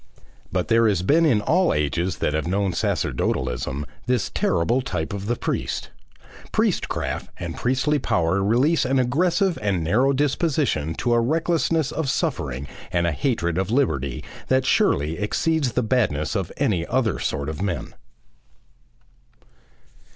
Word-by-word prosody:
But 90 -1 -1
there 115 0 +4
has 95 -4 +1
been 160 - +4
in 115 -8 +3
all 180 - +2
ages 80 +5 0
that 75 - -1
have 80 +1 -1
known 95 0 0
sacerdotalism 65 -3 -1 0.2
this 125 -4 0
terrible 115 +10 +1
type 80 -10 -3
of 100 0 -5
the 120 - +1
priest; - - -3 0.6
priestcraft - - -1
and 85 -2 -5
priestly 135 +4 +1
power 95 -4 +1
release 130 +11 +3
an 135 +1 +1
aggressive 170 +8 +1
and 100 -5 0
narrow 120 +12 +3
disposition 140 - 0
to 120 - 0
a 120 - +4
recklessness 160 +2 +1
of 160 -3 -2
suffering 65 - -2 0.2
and 85 -1 +1
a 85 - +1
hatred 85 - -1
of 95 0 -1
liberty 70 - 0 0.2
that 130 0 +2
surely 75 - +2
exceeds 140 +6 0
the 125 - +1
badness 105 - 0
of - - -2
any 90 -6 +1
other 120 -6 0
sort 70 0 -2
of 80 +1 -5
men. 95 -3 -3
110 Hz, 145 wpm, -23 LUFS, 85-135 Hz, 0.6 s, there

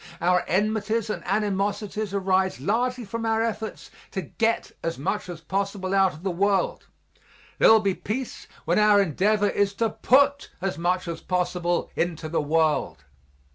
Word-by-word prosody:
Our 180 +1 +2
enmities 215 +3 0
and - - -4
animosities 205 +1 -1
arise 190 -1 +1
largely 245 +3 -1
from 230 +3 -5
our 225 0 +1
efforts 220 -1 -4 0.2
to 190 - -4
get 230 0 -1
as 165 0 -3
much 145 +6 -3
as 170 -3 -7
possible 195 +1 -2
out 195 -1 +4
of 155 - -13
the 195 - 0
world 195 +2 0 0.7
there - - +7
will 220 -1 +6
be 200 -2 +1
peace 245 +7 -5 0.2
when - - +2
our 210 -1 +5
endeavor 200 +4 +2
is 200 0 0
to 225 +1 0
put 280 +5 +3
as 190 -2 -2
much 180 +3 -1
as 165 -1 -5
possible 180 -1 -1
into 165 -2 -2
the 165 - 0
world. 155 -1 0
195 Hz, 160 wpm, -25 LUFS, 180-215 Hz, 0.7 s, there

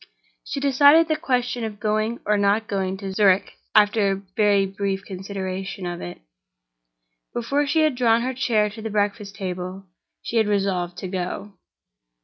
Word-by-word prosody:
She 280 - -4
decided 285 +4 +5
the 310 - +1
question 250 -6 -1
of 215 -2 -5
going 215 +2 -1
or 210 - +2
not 205 +2 +2
going 190 -1 -2
to 195 -1 -6
Zurich, 195 -1 +3 0.2
after 210 -1 +4
a 195 0 -3
very 205 -2 +3
brief 195 0 -3
consideration 190 0 -5
of 175 -1 -4
it. 90 - -8 1.1
Before 275 +5 0
she 320 +3 +2
had 310 -2 +3
drawn 235 -2 +3
her 260 +1 -2
chair 230 -4 +1
to 220 +1 -9
the 220 - -4
breakfast 205 -1 -1
table 185 0 -5 0.4
she 235 - -2
had 220 -2 +3
resolved 190 -4 0
to 190 - -5
go. 185 +2 -4
205 Hz, 160 wpm, -23 LUFS, 195-235 Hz, 1.1 s, decided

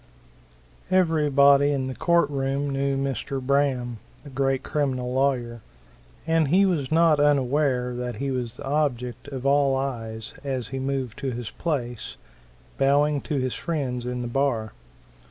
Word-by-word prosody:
Everybody 145 -6 +4
in 135 -2 -1
the 130 - -4
court 170 +6 +2
room 140 +1 -1
knew 135 0 0
Mr. 135 0 -2
Braham, 130 -3 0 0.2
the 145 - -11
great 135 0 0
criminal 130 -4 -1
lawyer, 125 -4 0 0.6
and 160 -1 +2
he 185 +7 +4
was 160 -8 0
not 160 -2 +4
unaware 135 -3 +2
that 125 -1 -4
he 140 +5 -3
was 125 -2 -3
the - - -8
object 125 -4 -1
of 135 -2 -6
all 140 -1 +3
eyes 115 -5 -4
as 130 -4 -3
he 135 - -4
moved 130 -4 -3
to 135 - -2
his 120 -2 -5
place, 120 - -4 0.6
bowing 145 +1 +3
to 150 - -3
his 130 -2 -1
friends 130 -7 -3
in 125 0 -3
the 120 - -3
bar. 120 -4 -1
135 Hz, 150 wpm, -25 LUFS, 125-145 Hz, 0.6 s, Everybody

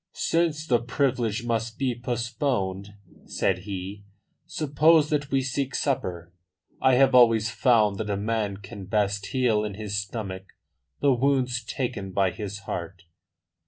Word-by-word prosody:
"Since 165 -2 0
the 125 -6 +3
privilege 120 -3 -1
must 115 -1 -2
be 130 -2 0
postponed," 120 -5 -2 0.3
said 95 -2 0
he, 100 +1 -6 0.4
"suppose 155 0 +3
that 145 -2 0
we 135 -1 +1
seek 135 +1 -2
supper. 90 - -2 0.5
I 130 -1 +5
have 135 +1 +4
always 115 -3 +5
found 110 -3 +3
that 105 -1 -3
a 100 - 0
man 105 -1 -1
can 100 0 -9
best 100 0 0
heal 120 -5 +1
in 105 -2 -4
his 105 -1 -5
stomach 100 -2 -5 0.5
the 140 -2 +4
wounds 125 -2 +1
taken 110 -5 -4
by 95 -1 +2
his 100 -2 -6
heart." 85 -1 -6
115 Hz, 140 wpm, -26 LUFS, 100-130 Hz, 0.5 s, I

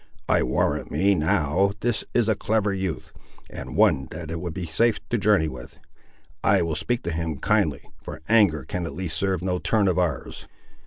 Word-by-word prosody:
I - - +3
warrant 60 - 0
me, 100 +1 +2
now, 85 +3 +1
this 120 -2 0
is 120 -3 +3
a 110 - +4
clever 105 0 0
youth, 95 -8 -4 0.4
and - - -7
one 65 -1 +3
that 80 0 -7
it 85 0 -4
would 85 -3 -5
be 90 -2 -4
safe 105 +7 +2
to 120 - +1
journey 100 -6 +3
with! 65 -4 -9 0.7
I - - +4
will 85 -1 -2
speak 80 +11 -2
to 85 - -2
him 80 -2 -3
kindly, - - 0
for - - -8
anger 100 - +4
can 90 -2 -3
at 70 - -7
least 85 -2 -2
serve 95 0 0
no 90 -1 -1
turn 105 0 +1
of 90 -1 +2
ours. 85 -7 -3
90 Hz, 195 wpm, -24 LUFS, 80-100 Hz, 0.7 s, a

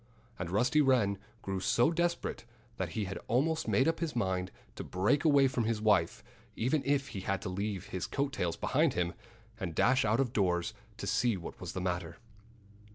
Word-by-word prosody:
And 90 - -3
Rusty 125 - +3
Wren 120 -8 +3 0.2
grew 95 -1 -2
so 120 - +3
desperate 170 -4 -1 0.3
that - - -3
he 110 -2 -1
had 95 +1 -5
almost 155 +7 +1
made 130 - +3
up 165 - +1
his 165 -5 -2
mind 95 -5 0 0.3
to - - -5
break 105 +11 +1
away 145 -4 +5
from 125 -3 -1
his 115 -1 0
wife, 105 -6 +2 0.3
even 130 +6 +1
if 140 -1 +1
he 100 - -5
had 95 0 -1
to - - -3
leave 100 0 -3
his 95 - -3
coat 140 -1 -1
tails 85 -6 -1
behind - - +2
him, 85 -1 0 0.5
and 90 -6 -4
dash 130 - +4
out 110 +3 +2
of 130 -3 0
doors 90 -4 +1 0.2
to - - -5
see 120 -5 +1
what 85 - -9
was - - -5
the 95 - -3
matter. 85 -2 -3
110 Hz, 195 wpm, -32 LUFS, 95-135 Hz, 0.5 s, away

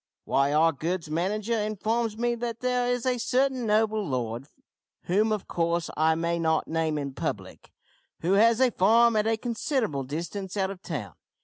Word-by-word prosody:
"Why, 140 +1 +1
our 160 +2 +4
goods 165 +2 -3
manager 200 +7 -1
informs 215 +1 -1
me 240 +1 +1
that 235 -1 -4
there 250 -1 +1
is 245 0 -2
a 250 -1 +1
certain 260 0 +1
noble 215 0 +2
lord, 125 - -3 0.6
whom 210 +5 +1
of 215 -3 -2
course 170 0 -1
I 160 +1 +3
may 170 +1 -1
not 160 -1 +1
name 160 -1 -1
in 140 -2 -4
public, - - -5 0.5
who 170 - 0
has 225 +3 +5
a 260 -2 +4
farm 230 +4 +4
at 215 0 +2
a 225 0 +1
considerable 230 - -1
distance 170 +8 -5
out 190 -1 0
of 190 -2 -10
town. 120 - -5
200 Hz, 175 wpm, -27 LUFS, 160-230 Hz, 0.6 s, has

